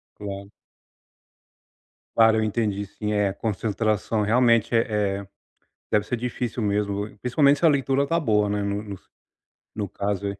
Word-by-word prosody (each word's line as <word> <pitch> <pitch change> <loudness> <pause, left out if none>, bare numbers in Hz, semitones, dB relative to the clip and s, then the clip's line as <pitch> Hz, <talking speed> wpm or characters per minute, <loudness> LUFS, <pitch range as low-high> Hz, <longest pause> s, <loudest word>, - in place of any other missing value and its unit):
Claro. 100 -1 -7 1.6
Claro 110 -1 +5
eu 110 - +1
entendi 105 -2 -1
sim, 105 +2 -4
é 105 -2 +1
concentração, 110 +1 -1
realmente 115 +1 +3
eh 105 -3 +1
eh, 100 - -12 0.6
deve 105 -1 +2
ser 125 - -1
difícil 120 -1 -3
mesmo 100 0 -1
principalmente 140 +4 +3
se - - -2
a 165 - +8
leitura 140 -1 +1
tá 165 +3 +1
boa, 105 -8 +2
né, 105 0 -1 1.1
no 105 -3 -3
caso. 100 +1 -3
105 Hz, 135 wpm, -24 LUFS, 100-120 Hz, 1.6 s, a